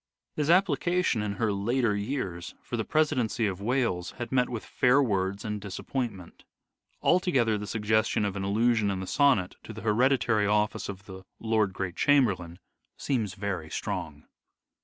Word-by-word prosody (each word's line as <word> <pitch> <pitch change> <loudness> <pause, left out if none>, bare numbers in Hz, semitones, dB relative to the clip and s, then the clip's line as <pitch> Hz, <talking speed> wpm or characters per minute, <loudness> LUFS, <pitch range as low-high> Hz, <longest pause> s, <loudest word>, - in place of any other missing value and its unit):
His 150 0 -1
application, 175 - +2
in 105 -1 -2
her 105 +1 0
later 115 +2 +1
years, 100 -6 -4
for - - -5
the 110 - -1
presidency 130 -6 +1
of 95 -2 -3
Wales 115 -6 -1
had 120 -1 -5
met 125 -1 +2
with 115 -3 -5
fair 125 +2 +3
words 100 -6 0
and 105 -1 -3
disappointment. 100 -1 -5 0.6
Altogether 135 - +3
the 105 0 -4
suggestion 110 0 +1
of 100 -1 -2
an 100 - -3
allusion 110 +2 +2
in 95 -1 -2
the 95 - -4
sonnet 130 -6 +2
to 110 - -9
the 110 - -8
hereditary 115 -1 +2
office 105 0 0
of 100 -1 -8
the 95 -1 -10 0.2
Lord 110 -3 +1
Great 90 -2 -4
Chamberlain 95 -12 +2 0.4
seems 110 -9 -2
very 95 -5 -4
strong. - - -4
110 Hz, 160 wpm, -28 LUFS, 100-125 Hz, 0.6 s, fair